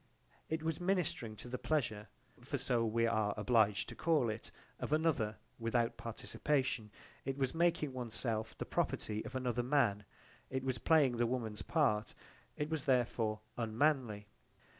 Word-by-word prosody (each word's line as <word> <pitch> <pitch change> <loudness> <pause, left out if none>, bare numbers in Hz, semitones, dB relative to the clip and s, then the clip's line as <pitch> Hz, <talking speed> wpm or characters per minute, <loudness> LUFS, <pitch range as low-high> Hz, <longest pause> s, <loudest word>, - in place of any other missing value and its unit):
It 160 0 -1
was 160 -1 -1
ministring 175 - 0
to 115 - -9
the 125 0 -4
pleasure, 115 -9 0 0.3
for 135 +3 -3
so 125 -3 +1
we 115 +1 +2
are 110 -3 +1
obliged 105 -2 +3
to - - -8
call 150 -9 +2
it, 110 - -7 0.3
of - - -4
another 150 -9 +2 0.2
without 115 0 +1
participation, 125 0 -1 0.3
it 135 0 -3
was 135 -2 0
making 165 -4 +2
one's 120 -3 -5
self 110 +1 -2
the - - -3
property 105 0 -1
of 130 - -8
another 125 -2 0
man, 120 -6 +2 0.4
it 130 0 -2
was 130 -1 -1
playing 145 -7 +4
the 120 0 +3
woman's 115 -4 -2
part: 110 -10 +1 0.4
it 150 - -1
was 160 -4 -1
therefore 115 -4 +1 0.2
unmanly. 115 -2 +1
120 Hz, 155 wpm, -36 LUFS, 110-145 Hz, 0.4 s, playing